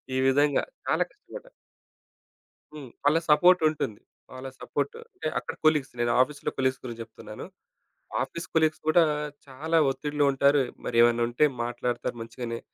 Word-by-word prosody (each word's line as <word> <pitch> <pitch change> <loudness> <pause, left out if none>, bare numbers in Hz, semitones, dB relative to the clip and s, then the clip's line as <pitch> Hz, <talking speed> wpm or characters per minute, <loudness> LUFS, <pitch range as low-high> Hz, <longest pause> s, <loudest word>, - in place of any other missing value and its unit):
ఈ - - +1
విధంగా 145 +2 +3 0.2
చాలా - - +2
కష్టపడ్డా. - - -12 1.2
హ్మ్. 145 -4 -9
వాళ్ళ 145 +3 +4
సపోర్ట్ 180 +4 +6
ఉంటుంది. 110 -9 -4 0.3
వాళ్ళ 130 +1 -7
సపోర్ట్ 145 -1 -2 0.2
అంటే, 155 - -5
అక్కడ - - -6
కొలీగ్స్ 150 -3 +3
నేను 120 0 +2
ఆఫీస్‌లో 140 +2 -1
కొలీగ్స్ 130 -1 0
గురించి 120 -2 -6
జేప్తున్నాను. 110 -1 -9 0.8
ఆఫీస్ 170 - -7
కొలీగ్స్ 155 -1 +2
కూడా 165 +2 +6 0.4
చాలా 155 +5 -1
ఒత్తిడిలో 145 +2 -1
ఉంటారు. 140 +1 +4 0.2
మరి 115 - -2
ఏమన్నా 120 0 +4
ఉంటే, 120 +5 +3 0.2
మాట్లాడతారు 120 0 -3
మంచిగానే. 115 0 -5
140 Hz, 135 wpm, -27 LUFS, 120-150 Hz, 1.2 s, సపోర్ట్